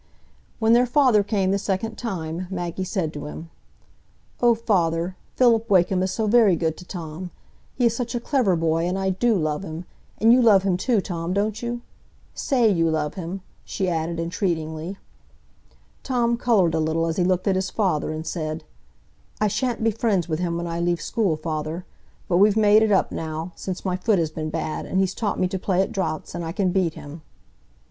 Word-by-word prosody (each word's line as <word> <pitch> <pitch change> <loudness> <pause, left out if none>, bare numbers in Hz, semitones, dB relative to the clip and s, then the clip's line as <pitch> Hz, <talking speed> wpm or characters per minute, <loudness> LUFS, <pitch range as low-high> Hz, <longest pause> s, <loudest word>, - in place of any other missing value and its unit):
When 225 0 +3
their 245 +1 +5
father 250 -5 +4
came 200 -2 0
the 200 - +1
second 205 +3 -2
time, 180 -5 -4
Maggie 175 -1 -3
said 180 -4 -2
to 145 0 -6
him, 165 +2 -9 0.9
"Oh, 240 -1 +5
father, 180 -5 0 0.2
Philip 230 -3 +3
Wakem 185 -1 +3
is 185 - 0
so 220 +3 -1
very 215 -4 +5
good 160 -1 -1
to 180 - -11
Tom; 175 0 -6 0.5
he 250 - +1
is 230 -1 +3
such 245 0 -3
a - - 0
clever 235 -7 +1
boy, 165 +1 +1
and 180 +2 -1
I 190 0 0
do 225 +5 +2
love 155 -3 -1
him. 165 -1 -6 0.3
And 225 +2 +5
you 255 - +5
love 205 -5 +6
him 190 -2 +1
too, 215 +3 +1
Tom, 170 -2 -3
don't 210 +2 -1
you? 240 0 -3 0.5
Say 250 -4 +2
you 165 -5 +2
love 150 -2 -1
him," 185 +1 -5 0.2
she 190 - -3
added 165 0 -2
entreatingly. 165 0 -2 1.0
Tom 240 -3 +1
coloured 215 -9 +2
a 160 - +1
little 160 +1 0
as 165 0 -2
he 180 - +2
looked 185 +1 +1
at 195 - +3
his 190 0 -1
father, 185 -9 0
and 155 +1 -5
said: 155 -2 -4 0.8
"I 215 - +3
sha'n't 245 +1 -1
be 225 - +3
friends 205 -6 0
with 155 -1 -2
him 170 -1 -1
when 170 - -3
I 170 0 -3
leave 175 0 +1
school, 195 -4 0
father; 155 +2 -4 0.4
but 175 - +2
we've 205 +2 +5
made 210 0 +6
it 220 -1 +2
up 190 - +3
now, 160 +2 -4
since 185 0 -6
my 185 -1 0
foot 210 +2 +2
has 160 -3 0
been 155 0 -4
bad, 155 -1 -3
and 190 - 0
he's 190 -1 +1
taught 210 0 -2
me 185 - +2
to 190 0 -3
play 185 0 0
at - - -5
draughts, 185 -5 -3
and 175 0 -4
I 165 0 -4
can 190 -2 +1
beat 175 -4 0
him." 145 +3 -9
185 Hz, 205 wpm, -23 LUFS, 165-215 Hz, 1.0 s, love